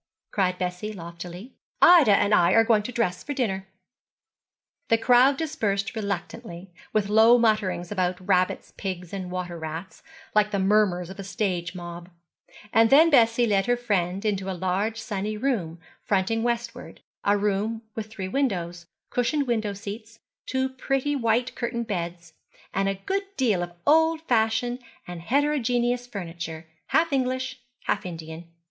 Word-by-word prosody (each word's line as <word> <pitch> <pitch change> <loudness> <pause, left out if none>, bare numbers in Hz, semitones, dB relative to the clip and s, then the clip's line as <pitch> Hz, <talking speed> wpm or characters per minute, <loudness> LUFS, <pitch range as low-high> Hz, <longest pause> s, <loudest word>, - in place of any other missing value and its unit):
cried 185 -2 +1
Bessie, 180 +4 -3
loftily. 175 +4 -9 0.3
'Ida 320 - +7
and 205 +1 +2
I 170 -4 +5
are 225 - +6
going 225 -2 +3
to 210 - -6
dress 230 -7 -1
for 290 - -4
dinner.' 195 -7 -1 1.2
The 230 - +4
crowd 245 +4 +5
dispersed 225 -11 -1
reluctantly, 190 -3 -5 0.2
with 215 -2 +1
low 220 +3 +6
mutterings 200 -6 +1
about 185 -1 -2
rabbits, 185 -2 +1
pigs, 180 -2 -5
and 185 -2 -4
water 180 -2 -4
rats, 160 +3 -7 0.3
like 210 0 +3
the 205 - -1
murmurs 190 -3 +2
of 190 - -11
a - - -4
stage 185 -3 -2
mob; 175 0 -8 0.6
and 225 0 +5
then 315 +6 +7
Bessie 235 -3 +5
led 200 -2 +1
her 245 0 +2
friend 195 -4 -1
into 195 -2 -1
a 185 - -3
large 195 +5 -1
sunny 210 -2 -3
room 205 -10 -1 0.2
fronting 205 +3 +1
westward, 235 0 -3 0.2
a 205 +1 +3
room 210 +3 -1
with 220 -1 -5
three 200 -4 -6
windows, 175 -8 -2 0.2
cushioned 255 +4 +1
window 220 -4 -1
seats, 210 +3 -8 0.3
two 260 0 0
pretty 270 +2 -1
white 240 -1 +1
curtained 235 -1 -3
beds, 170 -5 -5 0.4
and 195 0 +1
a 195 - -1
good 395 +1 -1
deal 220 -9 +2
of 175 0 -5
old 320 +1 +4
fashioned 240 -2 +1 0.3
and 175 -1 -7
heterogeneous 245 - +1
furniture, 170 -6 -6 0.2
half 325 -1 +2
English, 260 0 -1 0.2
half 200 - -1
Indian. 165 -1 -8
210 Hz, 150 wpm, -25 LUFS, 180-240 Hz, 1.2 s, Ida